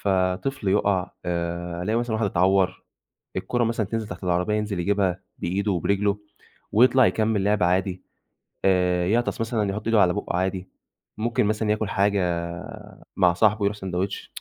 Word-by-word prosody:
فطفل 95 +6 0
يُقَع 95 -2 +1
آآ، 85 0 -3
ألاقي 110 +4 0
مثلًا 120 -2 -2
واحد 110 -1 0
إتعوّر، 95 0 +2 0.5
الكورة 120 -1 0
مثلًا 115 -2 -1
تنزِل 110 +1 -3
تحت 90 +1 -7
العربية 90 +4 +1
ينزِل 105 -3 -2
يجيبها 95 -1 0 0.2
بإيده 100 +4 -1
وبرِجله 100 +3 +1 0.5
ويطلَع 130 +2 +5
يكمّل 110 -3 +1
لِعب 105 -1 +2
عادي 90 +1 +1 0.6
آآ، 90 -2 +2
يعطس 120 +3 0
مثلًا 110 -3 0
يحُط 105 +2 -5
إيده 115 -2 +4
على 90 -1 +3
بُقُّه 105 -3 -3
عادي، 95 0 -2 0.5
ممكن 115 -1 +1
مثلًا 105 0 0
ياكل 105 -1 0
حاجة 100 0 +2 1.0
مع 90 -2 +4
صاحبه، 105 +3 +2
يرُوح 100 +1 0
سندوتش 95 -1 -4
100 Hz, 150 wpm, -24 LUFS, 90-110 Hz, 1.0 s, ويطلَع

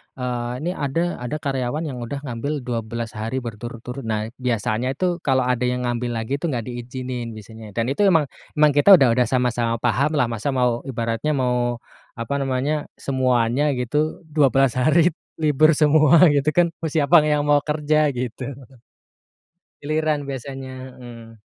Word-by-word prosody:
eee, 125 -2 -3
ini 175 - -1
ada 165 +3 -2
ada 125 +4 -4
karyawan 140 0 -2
yang 135 -6 -5
udah 140 +4 -6
ngambil 140 +2 -4
12 115 -1 -4
hari 115 +4 -4
berturut-turut. 120 +2 -7
Nah, 110 0 -2
biasanya 120 +1 -1
itu 180 +1 -1
kalau 130 -5 +1
ada 125 0 0
yang 125 0 -1
ngambil 120 0 -2
lagi 115 +5 -2
tuh 170 - -2
gak 120 - -2
diizinin 120 -1 -6
biasanya, 110 -1 -11
dan 115 - 0
itu 205 +8 +2
emang 165 -5 +4 0.3
emang 150 -1 +5
kita 145 +8 +7
udah 135 -8 +4
udah 125 +1 +2
sama-sama 120 -2 0
pahamlah 140 +3 +2
masa 115 +3 -4
mau 125 -2 +1
ibaratnya 115 +4 -2
mau 125 -2 0 0.4
apa 115 +3 -4
namanya, 135 +3 -1
semuanya 130 -1 +1
gitu 150 +7 -1
12 135 -4 +3
hari 160 +6 +4 0.3
libur 155 +1 +4
semua 155 +3 +5
gitu 140 0 0
kan. 175 -1 +3
Mau 165 - -2
siapa 155 +1 +5
yang 150 -1 +2
mau 145 0 +4
kerja? 150 0 +2
Gitu. 125 0 -4 1.4
Giliran 155 0 0
biasanya, 130 -1 -7
heeh. 115 -2 -12
130 Hz, 155 wpm, -22 LUFS, 120-150 Hz, 1.4 s, kita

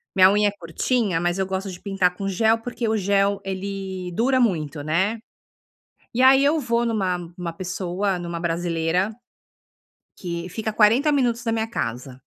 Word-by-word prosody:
Minha 185 0 +7
unha 205 0 +3
é - - -5
curtinha, 185 +1 -1
mas 175 +2 0
eu 190 - +1
gosto 190 +1 -3
de 175 - -9
pintar 195 -3 +1
com 195 +1 -4
gel 220 +4 +2
porque 240 0 -4
o 220 - +1
gel, 200 0 +2
ele 190 -1 -5
dura 255 +6 +2
muito, 155 -9 0
né. 190 +9 0 1.0
E 255 - +2
aí 265 +1 +7
eu 310 +3 +3
vou 240 -3 0
em - - 0
uma 190 -5 0
em 170 0 -10
uma 170 -1 -3
pessoa, 185 +2 -2
em 175 - -6
uma 170 -1 -4
brasileira, 170 +3 0 1.0
que 170 -1 -5
fica 220 +4 -3
40 230 +8 +4
minutos 240 -4 +1
da 225 - -1
minha 225 0 -1
casa. 125 - -5
195 Hz, 180 wpm, -23 LUFS, 175-225 Hz, 1.0 s, Minha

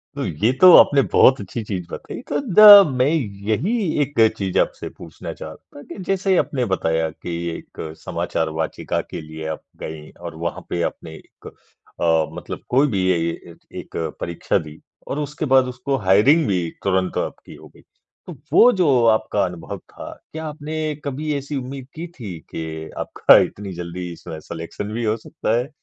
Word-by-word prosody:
तो - - -3
ये 105 +10 +1
तो 185 - +10
आपने 140 -1 +6
बहुत 130 - +6
अच्छी 100 +4 -5
चीज़ 95 -4 -4
बताई। - - -7
तो - - 0
द 205 -4 +9
मैं 130 - +3 0.4
यही 115 - 0 0.3
एक 145 -2 -2 0.2
चीज़ 95 -2 -1
आपसे - - -1
पूछना - - -8
चाहता - - -11
था - - -10
कि - - -8
जैसे 195 0 +2
आपने 130 -4 0
बताया 80 -2 0
कि 85 - -8 0.2
एक - - -13 0.2
समाचार 80 -1 -2
वाचिका 80 - -2
के - - -6
लिए 80 0 -9
आप 80 - -5 0.2
गईं 80 -1 -8
और 85 - -6
वहाँ 85 - -3
पे 85 - -2
आपने 80 - -13
एक - - -16
अ, 80 -2 -2
मतलब - - -7
कोई 135 +4 +4
भी 100 -7 -1
ए 85 - 0 0.3
य 85 - -13 0.2
एक - - -12 0.3
परीक्षा 85 -1 -1
दी। 75 +1 -12 0.3
और 145 - -3
उसके 150 +1 -4
बाद 130 -2 +4
उसको 125 +2 -2
हायरिंग 110 - +4
भी 95 -4 +1 0.2
तुरंत 95 -1 0
आपकी - - -5
हो - - -14
गई। - - -20 0.5
तो - - -8 0.2
वो 245 - +7
जो 145 - +3
आपका 110 -1 0
अनुभव 90 -2 -6
था, - - -11 0.2
क्या 160 0 -5
आपने 155 0 -6 0.3
कभी 150 +2 -3
ऐसी 140 +1 -5
उम्मीद 130 0 -6
की 165 +2 -6
थी 95 -8 -7
के 80 -1 -6
आपका - - +5
इतनी 100 -2 -1
जल्दी 85 0 -6
स 80 - -8
सिलेक्शन 85 +5 -6
भी 120 - -3
हो 110 0 0
सकता 110 +1 -2
है? 125 +3 -2
110 Hz, 180 wpm, -21 LUFS, 85-145 Hz, 0.5 s, तो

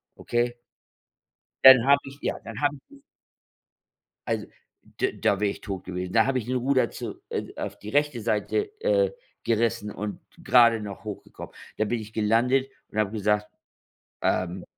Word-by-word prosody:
okay? 120 0 -1 1.1
Dann 130 -3 +10
habe 140 0 +6
ich, 135 +1 -10
ja - - -1
dann 115 -1 -7
habe 145 0 +2
ich 135 - -15 1.5
Also, - - -2 0.5
da 385 - +3
da 100 - 0
wäre 105 -1 +2
ich - - -10
tot 95 -3 -5
gewesen. 90 0 -5
Da 110 -1 +5
habe 135 -1 +1
ich 115 - -6
den 130 +2 -2
Ruder 130 -2 +2
zu, - - -7
äh - - -4
auf - - -5
die 105 - -8
rechte 145 -2 +1
Seite, 115 - -1
äh, - - +3 0.3
gerissen 115 -2 0
und 105 0 -5 0.2
grade 115 -2 +6
noch 100 -2 -7
hochgekommen. - - -8 0.2
Da 110 - +1
bin 115 +2 -1
ich 110 0 -9
gelandet 120 +5 +2 0.2
und - - -9
habe 105 -2 +1
gesagt: 105 -1 0 0.7
„Ähm, 90 0 -1
115 Hz, 160 wpm, -26 LUFS, 105-130 Hz, 1.5 s, Dann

